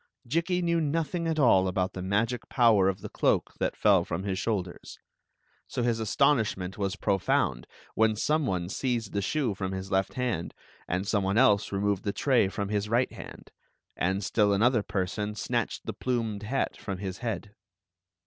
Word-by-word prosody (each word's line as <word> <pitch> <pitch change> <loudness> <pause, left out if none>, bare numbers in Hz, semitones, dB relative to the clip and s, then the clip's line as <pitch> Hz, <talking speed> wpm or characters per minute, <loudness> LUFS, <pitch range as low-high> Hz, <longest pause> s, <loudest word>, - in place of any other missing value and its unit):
'' - - -27
Jikki 170 +6 0
knew 170 -1 +2
nothing 165 +2 -1
at 160 -1 0
all 95 -10 +5
about 95 0 -1
the 95 - -5
magic 110 +6 -1
power 110 -6 +4
of 95 0 -4
the - - -5
cloak - - +1
that - - -1
fell 100 -4 +4
from 85 +2 -4
his 95 -2 -2
shoulders; 95 -6 -3 0.7
so 125 - -2
his 115 -1 0
aston 140 +5 +3
ishment 95 -4 -3
was 100 -1 -2
profound 95 - 0 0.3
when 110 -1 +3
some 150 +6 +1
one 90 -4 -1
seized 115 +1 -2
the 100 - 0
shoe 130 +1 0
from 95 -1 -4
his 95 0 -5
left 95 0 0
hand 120 -10 -2 0.3
and 90 +3 -2
some 100 -2 +1
one 95 +2 0
else 105 -5 +4
removed 100 0 0
the 100 - -1
tray 130 -8 +3
from 100 +1 -4
his 105 0 -1
right 120 +3 +2
hand, - - -11 0.4
and 95 +3 0
still 105 0 +2
another 115 +3 +3
person 105 +1 -3
snatched 105 - -2
the - - -3
plumed 115 -5 -2
hat 125 +6 -1
from 100 -3 -5
his 95 -1 -5
head. 110 -4 -4
105 Hz, 185 wpm, -28 LUFS, 95-120 Hz, 0.7 s, all